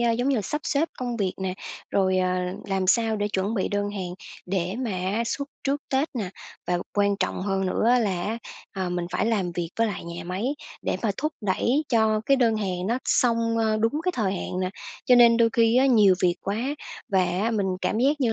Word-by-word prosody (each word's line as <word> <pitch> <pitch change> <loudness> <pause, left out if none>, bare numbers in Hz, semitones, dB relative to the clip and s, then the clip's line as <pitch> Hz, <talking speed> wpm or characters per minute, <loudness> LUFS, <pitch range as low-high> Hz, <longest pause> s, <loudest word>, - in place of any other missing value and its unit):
à, 235 -1 +3
giống 245 +3 0
như 275 - +2
là, 215 - 0
sắp 300 +8 -3
xếp 305 +3 +1
công 245 -2 -3
việc 195 -4 -1
nè, 185 -1 -1 0.4
rồi, 190 -1 +2
ờ, 185 0 +2 0.4
làm 195 -1 0
sao 225 +2 +3
để 205 0 -1
chuẩn 200 +2 -1
bị 190 - 0
đơn 205 0 -1
hàng 185 -3 -5 0.3
để 180 0 -1
mà 230 - -2
á 190 +4 -1
xuất 280 +3 -3 0.2
trước 280 +1 0
Tết 275 +4 +1
nè, 205 -7 -3 0.4
và 175 0 +1 0.2
quan 200 0 +2
trọng 185 - -2
hơn 195 -1 0
nữa 225 +6 +3
là 190 -6 0
á, 220 +5 -2 0.4
ờ, 185 -1 -1
mình 175 -1 -2
phải 195 +4 +1
làm 195 -6 0
việc 170 -1 -3
với 230 - +4
lại 205 -5 -4
nhà 170 0 -7
máy 185 +5 -3 0.4
để - - -1
mà 220 - +2
thúc 305 +2 -1
đẩy 235 +8 +1
cho 220 -3 +3
cái 275 - +5
đơn 230 -4 +3
hàng 185 -3 -2
nó 235 +4 +1
xong, 230 -2 +2
ờ, 220 -1 +2
đúng 225 +5 +1
cái 365 - +1
thời 205 -5 0
hạn 185 -1 -3
nè. 185 - -1 0.3
Cho 250 - +6
nên 235 -1 +7
đôi 230 -1 +5
khi 230 +1 +4
á 265 - +5
nhiều 210 -7 +6
việc 175 -1 +4
quá 200 +1 -2 0.5
và 190 -4 +3
á 185 +6 0
mình 210 -4 0
cảm 185 +4 0
giác 285 +4 +2
như 235 -4 +2
210 Hz, 235 wpm, -25 LUFS, 185-235 Hz, 0.5 s, nên